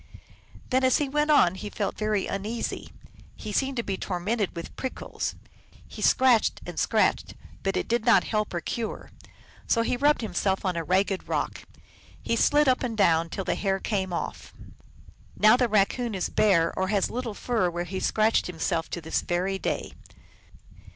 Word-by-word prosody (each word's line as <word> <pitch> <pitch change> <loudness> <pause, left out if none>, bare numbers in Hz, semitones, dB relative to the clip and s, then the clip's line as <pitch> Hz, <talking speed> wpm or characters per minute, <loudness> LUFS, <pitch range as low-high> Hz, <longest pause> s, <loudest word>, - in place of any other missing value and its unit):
Then 260 +1 +2
as 260 -1 +4
he 295 - 0
went 295 +2 0
on 285 - +5
he 205 +2 -6
felt 205 -1 -3
very 215 -2 0
uneasy: 215 +4 -4 0.4
he - - -7
seemed 270 -1 0
to 235 - 0
be 195 -3 -3
tormented 200 +3 -2
with 170 - -7
prickles, 260 - -4 0.5
he - - -10
scratched 255 -4 +4
and - - -5
scratched, - - +1 0.3
but 195 0 -1
it - - -2
did 235 0 0
not 235 0 +5
help 215 -1 -1
or 175 - -1
cure. 230 +4 -5 0.6
So 230 - +2
he 240 - 0
rubbed 290 +3 +3
himself 200 -3 -1
on 185 -2 0
a 165 - -2
ragged 190 +3 0
rock; - - -2 0.5
he 230 - -1
slid 295 +5 +3
up 255 -1 +3
and 235 -4 -3
down 165 -4 +3
it - - -12
till 195 - -3
the - - +1
hair 195 -1 -1
came 190 -3 -2
off. 170 - -5 0.8
Now 215 +2 +6
the 250 -1 +1
Raccoon 215 +2 +1
is 185 - -2
bare 170 -6 +3
or 190 - 0
has 200 -1 0
little 240 -3 -4
fur 225 -7 0
where 175 0 -3
he 185 +2 -5
scratched 220 +3 +2
himself, 165 -1 -2
to 175 - -5
this 160 +1 -1
very 185 +2 -1
day. - - -3
205 Hz, 180 wpm, -26 LUFS, 185-235 Hz, 0.8 s, Now